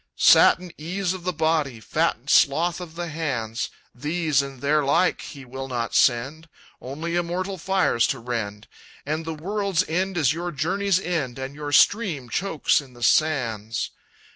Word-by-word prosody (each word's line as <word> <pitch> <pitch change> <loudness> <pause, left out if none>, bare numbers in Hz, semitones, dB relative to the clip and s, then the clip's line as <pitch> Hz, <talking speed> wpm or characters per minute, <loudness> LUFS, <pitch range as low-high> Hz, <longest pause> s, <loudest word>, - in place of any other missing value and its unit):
"Satin 180 -1 +5
ease 180 +4 -2
of 185 -2 -8
the 180 - +1
body, 155 -6 0
Fattened 110 - -1
sloth 170 +5 +3
of 165 -2 -9
the 175 0 -4
hands, 120 -8 -3 0.2
These 150 +1 0
and 135 -2 -8
their 150 +2 +2
like 170 +6 +2
he 140 -4 -10
will 130 +2 -7
not 120 -3 -3
send, 140 +6 +1 0.3
Only 155 +6 -4
immortal 180 +2 -2
fires 185 -10 +2
to 135 - -1
rend 110 -4 -4 0.4
And 155 +3 -2
the 160 -1 -4
world's 195 +2 -1
end 185 +3 -1
is 145 -4 +3
your 175 +2 -4
journey's 185 +6 0
end, 155 -10 -2
And 130 +1 -5
your 145 0 -6
stream 165 - +3
chokes 160 - +1
in 135 -3 -16
the 120 -1 -10
sands. 115 -7 +1
155 Hz, 160 wpm, -24 LUFS, 130-175 Hz, 0.4 s, Satin